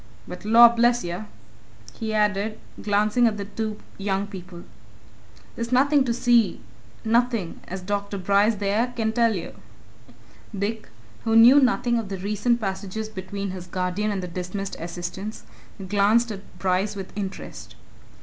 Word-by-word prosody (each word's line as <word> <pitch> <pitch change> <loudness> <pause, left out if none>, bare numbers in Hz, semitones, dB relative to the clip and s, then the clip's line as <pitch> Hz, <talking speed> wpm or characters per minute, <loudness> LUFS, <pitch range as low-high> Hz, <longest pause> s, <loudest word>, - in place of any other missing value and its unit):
But 180 0 -8
lor' 235 +2 +8
bless 240 +1 +2
yer!" 175 +5 -5 0.7
he 220 +8 -4
added, 210 0 0 0.2
glancing 210 +3 +2
at 215 -2 -1
the 200 - -4
two 215 +1 -4 0.2
young 195 0 -1
people. 185 -3 -10 0.9
"There's 235 +1 -4
nothing 275 +2 +4
to 240 - 0
see 235 -4 +3 0.5
nothing! 230 -5 +1
as 190 +1 -5
Dr. 200 +1 -3
Bryce 200 +4 +3
there 210 +5 0
can 220 -1 0
tell 230 -1 +2
you." 175 - -5 1.1
Dick, 215 +3 -3 0.4
who 225 0 +1
knew 240 +5 +8
nothing 245 -2 +2
of 215 -4 -6
the 195 - -4
recent 210 +5 0
passages 200 +1 -4
between 200 -1 -5
his 180 -1 -8
guardian 185 +4 -1
and 195 -3 -2
the - - -4
dismissed 180 +3 -5
assistant, 175 +5 -6 0.4
glanced 210 +4 +3
at 195 -2 -6 0.2
Bryce 190 +2 0
with 195 -1 -8
interest. 195 -2 -7
210 Hz, 145 wpm, -24 LUFS, 190-230 Hz, 1.1 s, lor